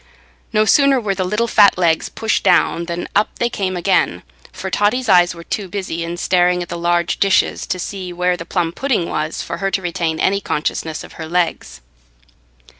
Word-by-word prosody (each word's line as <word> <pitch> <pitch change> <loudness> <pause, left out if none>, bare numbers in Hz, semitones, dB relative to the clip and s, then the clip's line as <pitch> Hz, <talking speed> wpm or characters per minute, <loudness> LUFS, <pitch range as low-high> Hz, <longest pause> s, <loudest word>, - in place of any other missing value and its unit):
No 215 0 +3
sooner 275 +2 +4
were 210 -4 -1
the 190 -1 -2
little 210 +5 0
fat 205 -4 +5
legs 170 -3 +1
pushed 225 0 -1
down 170 - +3
than 170 0 -4
up 210 - +1
they 240 0 0
came 185 -4 -2
again, 175 - +1 0.3
for 190 - -6
Totty's 220 +6 +1
eyes 175 -3 +4
were 170 - -10
too 200 +3 -4
busy 180 -3 -4
in 170 +1 -5
staring 180 0 +2
at 175 - -12
the 175 - -4
large 175 0 0
dishes 195 -1 +2
to - - -2
see 185 0 -5
where 180 +1 0
the 165 - -7
plum 165 0 -1
pudding 230 -4 -1
was 155 +1 -3
for - - -5
her 195 - -1
to 195 - 0
retain 170 -2 -2
any 200 +1 +1
consciousness 155 0 -3
of - - -12
her 160 - -5
legs. 175 - -2
180 Hz, 195 wpm, -18 LUFS, 170-200 Hz, 0.3 s, fat